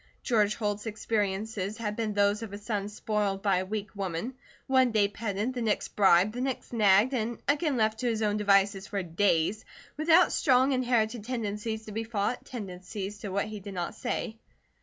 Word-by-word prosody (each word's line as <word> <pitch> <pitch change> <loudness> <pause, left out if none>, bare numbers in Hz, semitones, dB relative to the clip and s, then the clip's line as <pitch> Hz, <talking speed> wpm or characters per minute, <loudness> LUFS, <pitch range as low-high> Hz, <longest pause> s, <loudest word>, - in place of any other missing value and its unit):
George 215 -4 +2
Holt's 210 0 -2
experiences 210 -1 -2
had 210 -2 -3
been 215 -2 -2
those 205 +1 +2
of 225 -3 -6
a - - -4
son 205 -1 -3
spoiled 210 -2 -2
by 195 -3 +3
a 185 - -1
weak 210 0 -3
woman, 195 +5 -3 0.3
one 260 -2 +4
day 210 -2 +3
petted, 210 +3 -3
the 245 - -3
next 220 -2 0
bribed, 195 0 +4
the 245 - -4
next 260 -1 -3
nagged, 210 +3 +4 0.3
again 290 -1 +1
left 220 -1 +1
to 250 - -1
his 220 -1 -1
own 210 -1 +1
devices 195 -1 +3
for 200 -2 -2
days, 175 +3 +1 0.3
with 310 +2 -3 0.2
strong 260 -1 +3
inherited 240 -3 +1
tendencies 220 -2 -3
to 215 - -8
be 220 +2 -3
fought, 220 +1 -2
tendencies 200 -2 -6
to 205 - -5
what 200 +1 0
he 215 0 -7
did 200 0 -8
not 175 -1 -3
say. 220 +1 -4
210 Hz, 180 wpm, -29 LUFS, 200-230 Hz, 0.3 s, one